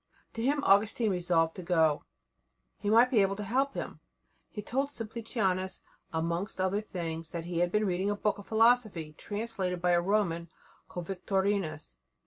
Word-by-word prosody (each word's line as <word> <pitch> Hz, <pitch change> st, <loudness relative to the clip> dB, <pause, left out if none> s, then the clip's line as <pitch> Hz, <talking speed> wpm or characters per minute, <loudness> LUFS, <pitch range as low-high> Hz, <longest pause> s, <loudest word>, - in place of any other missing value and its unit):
To 225 Hz, -, -4 dB
him 285 Hz, +4 st, +1 dB
Augustine 210 Hz, +2 st, +3 dB
resolved 170 Hz, -3 st, +2 dB
to -, -, -5 dB
go; 160 Hz, -4 st, +2 dB, 0.7 s
he 205 Hz, -, -2 dB
might 235 Hz, +3 st, +6 dB
be 225 Hz, -5 st, +5 dB
able 195 Hz, 0 st, +2 dB
to 210 Hz, -, -5 dB
help 265 Hz, +7 st, 0 dB
him. -, -, -5 dB, 0.5 s
He 210 Hz, -, -7 dB
told 270 Hz, +6 st, -1 dB
Simplicianus, 215 Hz, -6 st, -2 dB, 0.3 s
amongst 170 Hz, +5 st, -2 dB
other 190 Hz, +2 st, +1 dB
things, 165 Hz, -5 st, -5 dB
that 170 Hz, -1 st, -5 dB
he 175 Hz, -1 st, -2 dB
had 175 Hz, 0 st, +2 dB
been 210 Hz, +1 st, +2 dB
reading 190 Hz, +1 st, 0 dB
a 205 Hz, -, 0 dB
book 205 Hz, 0 st, -1 dB
of 200 Hz, -, -11 dB
philosophy 220 Hz, -8 st, +3 dB
translated 205 Hz, -4 st, -3 dB
by 180 Hz, +1 st, +2 dB
a 175 Hz, 0 st, +4 dB
Roman 175 Hz, -4 st, 0 dB, 0.4 s
called 175 Hz, -1 st, -6 dB
Victorinus. 190 Hz, -, -1 dB
195 Hz, 165 wpm, -30 LUFS, 175-215 Hz, 0.7 s, might